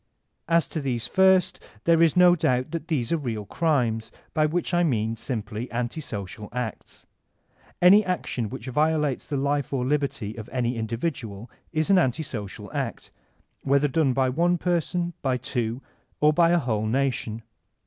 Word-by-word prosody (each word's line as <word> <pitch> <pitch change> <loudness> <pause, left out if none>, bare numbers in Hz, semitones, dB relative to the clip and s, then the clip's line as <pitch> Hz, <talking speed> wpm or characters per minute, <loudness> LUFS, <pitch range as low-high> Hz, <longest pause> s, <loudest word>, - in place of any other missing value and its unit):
As 165 -3 +3
to 155 - -3
these 125 -4 -1
first 190 -1 +3 0.2
there 165 -1 +4
is 165 0 +4
no 180 -1 +7
doubt 130 -5 0
that 165 -1 -4
these 130 -8 -1
are 165 - +3
real 115 -8 -4
crimes, 120 - 0 0.2
by 155 -2 +3
which 175 +3 -2
I 175 - +3
mean 115 -7 0
simpiy 110 -1 -4
anti 120 +6 -3
social 105 -4 -6
acts. 120 -2 -6 0.8
Any 200 +4 +8
action 160 - -2
which 110 - -7
violates 150 +1 0
the 145 - -2
life 140 0 0
or 130 -3 -1
liberty 135 -6 -1
of 110 0 -8
any 125 -1 -1
indi 115 0 -3
vidual 115 -7 -4 0.2
is 155 +3 +1
an 190 - +6
anti 145 -1 +1
sodal 105 -8 -7
act, - - -4 0.5
whether 140 +1 +3
done 145 -1 +2
by 130 +1 +2
one 170 +6 +2
person, 175 0 -1
by 130 -2 +1
two, 125 -1 -3 0.4
or 150 +1 +4
by 165 +1 +4
a 175 - +4
whole 110 -8 -1
nation. 120 -3 -1
135 Hz, 170 wpm, -25 LUFS, 115-165 Hz, 0.8 s, Any